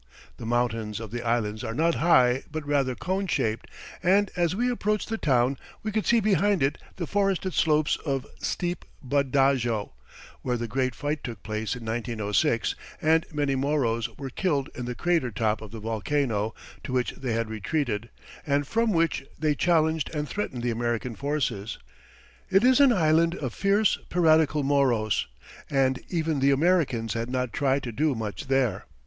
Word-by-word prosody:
The 115 - -7
mountains 115 -3 -1
of 110 -2 -7
the 120 0 -3
island 115 -2 -1
are 115 - -4
not 165 +4 +2
high 130 -6 +4
but 155 -1 -4
rather 140 -3 +1
cone 190 +8 -2
shaped, 110 -9 -1 0.3
and 190 +3 +3
as 175 0 +1
we 240 +4 +1
approached 210 -4 -1
the 225 - -1
town 130 -1 +2 0.2
we 215 - -2
could 215 0 -1
see 235 - +5
behind 205 -4 +2
it 135 - 0 0.2
the 175 - -3
forested 195 -1 0
slopes 155 -1 +2
of 135 -3 -2
steep 175 -1 -2 0.2
Bud 140 0 0
Dajo, 125 -6 +2 0.5
where 125 -1 -1
the 120 0 -3
great 130 +2 -1
fight 145 +1 -3
took 115 -5 -7
place 110 +2 -3
in 120 -2 -9
1906 115 +2 0 0.3
and 160 +1 +3
many 145 -2 0
Moros 130 -4 0
were 135 -2 -6
killed 145 -4 -1
in 125 - -5
the 125 0 -4
crater 170 -6 +1
top 110 0 -1
of 110 - -8
the 115 - -8
volcano, 110 0 -1 0.3
to 130 - -5
which 125 -1 +1
they 125 -4 -4
had 115 -1 -1
retreated, 110 0 -2 0.3
and 145 0 +1
from 225 +6 +1
which 165 -4 +1
they 155 0 +1
challenged 160 -1 +2
and 150 0 -2
threatened 130 -12 -4
the 120 - +1
American 120 +1 -2
forces. 125 -8 -2 0.7
It 195 +3 +4
is 255 +1 +5
an 280 -2 +7
island 165 -3 +3
of 130 -9 -4
fierce, 200 +1 +2
piratical 160 -3 +3
Moros, 130 -6 +2 0.4
and 135 -2 +1
even 160 -4 0
the 135 +1 +4
Americans 140 - +2
had 115 +1 -3
not 125 -2 -2
tried 135 +1 +1
to 120 - -4
do 145 +4 +1
much 110 +2 -5
there. 130 -7 +1
135 Hz, 175 wpm, -26 LUFS, 115-160 Hz, 0.7 s, an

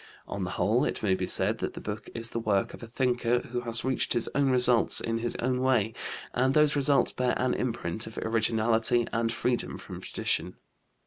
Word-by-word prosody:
On 100 - -5
the 90 - -3
whole, 110 +7 +2
it - - -3
may 100 -3 +2
be 95 - -2
said - - +3
that - - -4
the - - -6
book 105 +1 -7
is 115 0 -3
the 115 - -3
work 105 -4 -1
of - - -11
a 115 - -8
thinker 125 0 0
who 120 0 -5
has 115 0 +1
reached 130 -1 0
his 120 -2 +1
own 140 -1 +1
results 125 -2 +5
in 115 0 -2
his 120 +1 -3
own 125 +1 -1
way, 120 -4 +1 0.4
and 130 +2 +1
those 150 -1 +3
results 140 -2 +2
bear 125 -1 -1
an 130 0 0
imprint 110 -4 -2
of 110 - -11
originality 115 +1 +1
and 115 0 0
freedom 120 +1 -2
from - - -10
tradition. - - -2
120 Hz, 205 wpm, -27 LUFS, 110-125 Hz, 0.4 s, results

